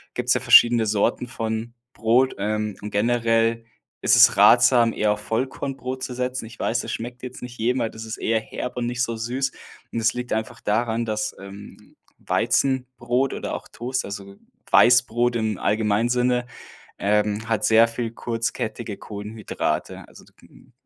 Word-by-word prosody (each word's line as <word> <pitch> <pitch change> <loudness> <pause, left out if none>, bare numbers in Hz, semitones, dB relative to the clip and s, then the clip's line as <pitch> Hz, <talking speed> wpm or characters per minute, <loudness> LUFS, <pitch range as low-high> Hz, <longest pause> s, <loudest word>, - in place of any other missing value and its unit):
Gibt's - - +1
ja - - 0
verschiedene 120 -1 +6
Sorten 105 +4 0
von 115 -1 -4 0.2
Brot, 120 +4 +2
ähm, 105 0 -2
und 105 - -5
generell 115 +1 +1 0.4
ist - - +4
es - - +6
ratsam, 120 -1 +6
eher 105 0 +1
auf 105 - -2
Vollkornbrot 130 +3 -4
zu 125 - -4
setzen. 125 -1 -3
Ich 115 +1 -12
weiß, 115 - -1
das - - -4
schmeckt 120 +2 -6
jetzt 125 - -8
nicht 125 0 -9
jedem, 125 +3 +1
weil 115 - 0
das 110 0 -9
ist 110 - -5
eher 115 0 0
herb 125 +3 -6
und 120 - -1
nicht 120 0 -1
so 115 -1 -3
süß. 125 +4 -2 0.4
Und 115 - -2
es 110 - +2
liegt 125 0 -6
einfach 110 0 -3
daran, 115 +2 0
dass, 105 -1 -3
ähm, 100 +1 -12 0.2
Weizenbrot 130 -1 0
oder - - -5
auch - - -8
Toast 130 +2 -3
also 100 0 -8 0.4
Weißbrot 120 -1 +4
im 110 -3 -1
allgemeinen 105 +2 +1
Sinne, 125 0 +1 0.5
ähm, 105 +1 0
hat 110 -2 0
sehr 115 +1 +6
viel 115 0 -4
kurzkettige 115 -2 -4
Kohlenhydrate. 105 +1 -4
Also - - -16
k - - -23
hm, - - -21
115 Hz, 165 wpm, -23 LUFS, 110-125 Hz, 0.5 s, verschiedene